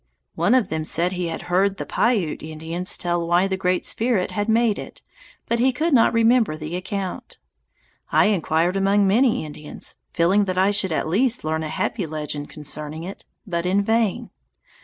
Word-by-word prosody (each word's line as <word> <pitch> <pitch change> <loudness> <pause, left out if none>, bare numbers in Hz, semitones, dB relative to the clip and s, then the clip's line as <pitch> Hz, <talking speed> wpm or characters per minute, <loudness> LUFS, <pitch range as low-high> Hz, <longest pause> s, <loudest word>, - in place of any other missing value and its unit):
One - - +2
of 245 -7 +2
them 160 0 -2
said 170 +3 0
he 180 -2 -2
had 165 - -5
heard 190 +2 +1
the - - -5
Piute 210 -10 0
Indians 160 +4 -3
tell 175 -1 -1
why 175 +3 +3
the 190 - -1
Great 185 -1 0
Spirit 225 -5 0
had 205 +1 -2
made 225 -1 +2
it, - - -10 0.4
but 235 - 0
he 260 +2 +4
could 310 +5 -1
not 230 -3 +5
remember 230 -7 +3
the 155 +2 -5
account. 190 +1 -5 0.7
I - - +4
inquired 175 -3 +1
among 195 +1 +3
many 220 -1 +2
Indians, 150 0 -5
feeling 185 +4 +2
that 185 -1 -3
I 190 +2 +4
should 200 -3 +2
at 155 - -1
last 235 +8 +1
learn 160 +1 -1
a 155 - -4
happy 185 +3 -2
legend 150 -1 -4
concerning 150 +1 -5
it, 190 +3 -8 0.2
but 170 -2 -2
in 195 +2 +2
vain. 220 -1 0
185 Hz, 180 wpm, -22 LUFS, 165-210 Hz, 0.7 s, not